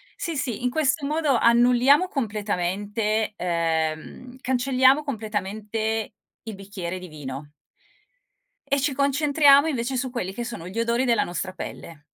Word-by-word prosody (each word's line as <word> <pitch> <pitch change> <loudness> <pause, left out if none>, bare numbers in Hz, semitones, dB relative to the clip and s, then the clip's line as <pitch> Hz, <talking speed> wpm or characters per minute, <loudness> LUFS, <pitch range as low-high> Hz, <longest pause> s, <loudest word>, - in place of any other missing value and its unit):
sì, 330 -4 -4
sì, 245 -3 -2
in 250 - +2
questo 290 +1 0
modo 305 -3 +1
annulliamo 245 +8 +4
completamente 210 - -2
ehm, 165 +7 -2
cancelliamo 260 +2 +3
completamente 220 -2 -3 0.3
il 220 -2 -7
bicchiere 190 -2 -6
di 180 - -9
vino 145 -2 -8 1.2
e 280 0 +2
ci 285 -1 0
concentriamo 285 +1 +4
invece 260 -2 -2
su 255 +1 -1
quelli 195 -7 -4
che 240 - -4
sono 180 -8 -7
gli 210 +5 -5
odori 235 +3 +1
della 235 -2 +3
nostra 185 +1 -4
pelle. 160 -3 -8
230 Hz, 135 wpm, -24 LUFS, 195-270 Hz, 1.2 s, annulliamo